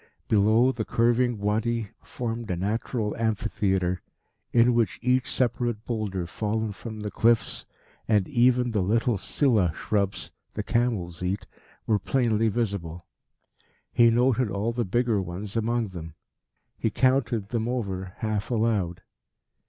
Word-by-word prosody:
Below, 110 Hz, +4 st, +4 dB
the 120 Hz, -4 st, -3 dB
curving 120 Hz, +1 st, +2 dB
Wadi 110 Hz, +2 st, -1 dB
formed 115 Hz, -1 st, -5 dB
a 90 Hz, -, 0 dB
natural 105 Hz, +3 st, -2 dB
amphitheatre 95 Hz, -5 st, 0 dB, 0.5 s
in 120 Hz, +1 st, +5 dB
which 115 Hz, -5 st, +1 dB
each 125 Hz, 0 st, +2 dB
separate 120 Hz, -2 st, 0 dB
boulder 105 Hz, -6 st, -2 dB
fallen 110 Hz, +4 st, -2 dB
from 110 Hz, +1 st, -8 dB
the 105 Hz, -1 st, -4 dB
cliffs, 115 Hz, +3 st, +1 dB, 0.4 s
and 105 Hz, -4 st, +3 dB
even 125 Hz, 0 st, +3 dB
the 105 Hz, -3 st, +1 dB
little 110 Hz, +3 st, +1 dB
silla 110 Hz, -, +2 dB
shrubs 100 Hz, -2 st, -1 dB, 0.2 s
the -, -, -2 dB
camels 105 Hz, -9 st, -1 dB
eat, 95 Hz, +3 st, -2 dB, 0.4 s
were 105 Hz, -2 st, +2 dB
plainly 115 Hz, 0 st, +1 dB
visible. 95 Hz, -7 st, -2 dB, 0.9 s
He 115 Hz, -1 st, +6 dB
noted 125 Hz, 0 st, +2 dB
all 100 Hz, +4 st, -1 dB
the 120 Hz, -1 st, -1 dB
bigger 115 Hz, +1 st, +1 dB
ones 95 Hz, +4 st, -6 dB
among 115 Hz, 0 st, 0 dB
them. 80 Hz, -4 st, -8 dB, 0.6 s
He 110 Hz, -, +1 dB
counted 120 Hz, -3 st, +1 dB
them 115 Hz, -2 st, -1 dB
over 95 Hz, -7 st, -3 dB
half 110 Hz, -2 st, -2 dB
aloud. 105 Hz, -7 st, 0 dB
110 Hz, 130 wpm, -26 LUFS, 100-120 Hz, 0.9 s, He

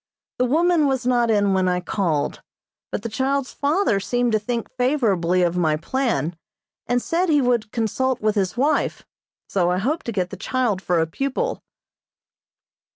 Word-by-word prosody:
The 250 Hz, -, +3 dB
woman 320 Hz, +3 st, +3 dB
was 265 Hz, -2 st, -1 dB
not 240 Hz, -2 st, +2 dB
in 205 Hz, -2 st, +3 dB
when 185 Hz, -1 st, +2 dB
I 180 Hz, 0 st, +1 dB
called, 175 Hz, -5 st, -1 dB, 0.5 s
but -, -, -3 dB
the -, -, -2 dB
child's 265 Hz, +4 st, -1 dB
father 290 Hz, -, +1 dB
seemed 245 Hz, +4 st, 0 dB
to 215 Hz, -, +2 dB
think 230 Hz, +2 st, -3 dB
favorably 210 Hz, -, +1 dB
of 175 Hz, 0 st, 0 dB
my 155 Hz, -3 st, +2 dB
plan, 180 Hz, -, -1 dB, 0.5 s
and 245 Hz, +1 st, +2 dB
said 340 Hz, +7 st, 0 dB
he 295 Hz, -2 st, +4 dB
would 240 Hz, -5 st, +1 dB
consult 245 Hz, +3 st, 0 dB
with 215 Hz, 0 st, +1 dB
his 195 Hz, 0 st, -1 dB
wife, 290 Hz, +4 st, 0 dB, 0.4 s
so 180 Hz, -3 st, +1 dB
I 180 Hz, -, +1 dB
hope 275 Hz, -, -1 dB
to 235 Hz, -, -2 dB
get 185 Hz, -4 st, -2 dB
the 195 Hz, -, -7 dB
child 230 Hz, -2 st, -1 dB
for 180 Hz, -3 st, +1 dB
a -, -, +2 dB
pupil. 275 Hz, -, -2 dB
235 Hz, 170 wpm, -22 LUFS, 185-265 Hz, 0.5 s, he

